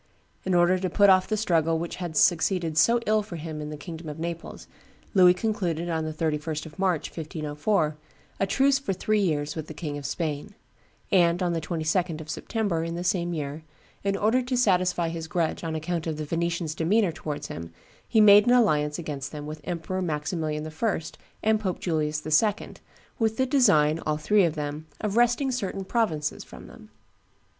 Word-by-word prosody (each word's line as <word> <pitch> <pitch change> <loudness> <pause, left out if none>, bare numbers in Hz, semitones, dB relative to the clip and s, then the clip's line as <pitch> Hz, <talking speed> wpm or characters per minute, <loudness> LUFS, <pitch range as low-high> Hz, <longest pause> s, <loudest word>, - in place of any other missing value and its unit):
In 190 -1 +1
order 175 +1 +4
to 185 0 -1
put 200 +2 +5
off 185 0 +4
the 215 - 0
struggle 165 -6 +2
which 170 +1 -4
had 175 -4 -4
succeeded 175 -1 +2
so 235 +9 +4
ill 215 0 +3
for 205 -4 -8
him 155 -1 -6
in 150 - -5
the 150 - -6
kingdom 160 +1 -8
of 150 - -7
Naples, 170 +1 -6 0.5
Louis 180 -3 +6
concluded, 180 -5 -2
on 160 -1 -1
the 155 - -3
31st 155 0 -2
of 155 +1 -12
March, 185 -5 0
1504, 155 +1 -1 0.4
a 195 - +1
truce 270 +5 +3
for 275 -8 -2
three 215 +3 0
years 150 -6 0
with 155 -2 -5
the 155 - -9
King 150 -2 -4
of 140 - -5
Spain; 160 +4 -4 0.6
and 175 -2 +3
on 175 -1 0
the 165 - -1
22d 165 +1 -1
of 155 0 -6
September, 200 -8 -2
in 165 0 -4
the 175 - -4
same 175 -2 0
year, 150 0 -4 0.4
in 195 0 0
order 225 +5 +2
to 250 0 -2
satisfy 180 -6 +2
his 165 -1 -5
grudge 170 -1 -1
on 160 -1 -3
account 165 +1 -3
of 155 -2 -2
the 155 - -4
Venetians' 170 0 -2
demeanor 185 +4 +2
towards 155 -2 -5
him, 85 +1 -7 0.4
he 225 - +2
made 210 0 +8
an 245 - +5
alliance 150 -11 +3
against 145 -5 -5
them 150 -1 -7
with 155 0 -7
Emperor 175 +2 -3
Maximilian 155 -1 -2
I. 175 +5 -1 0.4
and 220 0 +3
Pope 190 -4 -2
Julius 155 -3 -1
II., 200 +7 +1 0.5
with 220 -1 +1
the 260 - +2
design, 165 - +4
all 155 -1 0
three 200 +5 +3
of 165 -1 -1
them, 150 +1 -5
of 210 -1 -2
wresting 240 +3 +3
certain 195 -5 -3
provinces 170 -10 -1
from - - -12
them. - - -14
170 Hz, 190 wpm, -26 LUFS, 155-195 Hz, 0.6 s, made